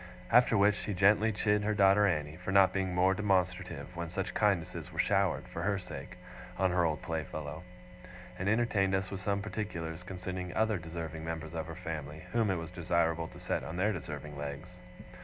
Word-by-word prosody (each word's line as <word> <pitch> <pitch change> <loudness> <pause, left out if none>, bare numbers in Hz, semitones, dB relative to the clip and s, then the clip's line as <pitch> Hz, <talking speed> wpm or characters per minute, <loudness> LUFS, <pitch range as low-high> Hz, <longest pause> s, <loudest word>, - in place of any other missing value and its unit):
After 125 -2 +6
which 100 +1 +5
she 105 - -3
gently 105 +4 +5
chid 105 0 +2
her 105 0 +1
daughter 100 +1 +5
Annie, 75 -4 -1
for 90 +1 -4
not 95 -1 +6
being 95 -2 -1
more 95 +2 +4
demonstrative 95 -2 -1
when 85 -1 -4
such 95 +3 -3
kindnesses 100 -6 0
were - - -11
showered, - - +2
for - - -6
her 100 0 +1
sake, 90 -7 -8 0.4
on 95 -1 +2
her 90 0 +3
old 80 -2 0
playfellow; 80 -1 -4 0.8
and 95 +2 0
entertained 105 -4 +2
us 95 -1 -2
with 100 -1 -4
some 100 +1 0
particulars 85 -7 -4
concerning 90 0 -5
other 110 -3 +2
deserving 80 -1 -6
members 80 -1 -5
of 80 -2 -3
her 80 - -7
family, 75 -1 -6
whom 115 -3 +2
it 95 - +2
was 80 0 -6
desirable 85 -2 0
to - - -12
set - - -2
on 80 - -5
their 105 +4 +2
deserving 75 -4 -6
legs. 70 +5 -7
90 Hz, 190 wpm, -32 LUFS, 80-100 Hz, 0.8 s, After